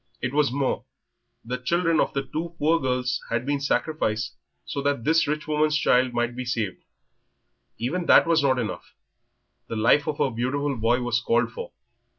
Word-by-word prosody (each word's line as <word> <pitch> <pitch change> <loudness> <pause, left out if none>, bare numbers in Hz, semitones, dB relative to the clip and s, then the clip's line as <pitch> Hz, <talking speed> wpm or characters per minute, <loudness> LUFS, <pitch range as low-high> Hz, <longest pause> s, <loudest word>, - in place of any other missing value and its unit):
It 125 +1 -3
was 150 -3 +2
more. 135 0 -1 0.6
The 125 +2 -3
children 165 +4 +1
of - - 0
two 155 +5 -3
poor 165 +2 +2
girls 125 -2 -1
had 120 +1 -1
been 140 0 -1
sacrificed 115 -7 -1 0.3
so 140 - -3
that 140 -4 0
this 160 +3 +3
rich 150 +1 -2
woman's 150 0 +2
child 125 -3 +3
might 120 0 -1
be 130 - -4
saved. 115 -6 -3 1.0
Even 170 +9 -2
that - - +7
was 165 -2 +3
not 135 -2 +2
enough, 115 -4 -5 0.7
the - - -5
life 115 +7 +3
of 150 -2 -2
her 135 - +1
beautiful 135 +4 -1
boy 120 +2 +1
was 120 -1 0
called 120 0 +1
for. 480 +1 -7
135 Hz, 170 wpm, -25 LUFS, 120-150 Hz, 1.0 s, that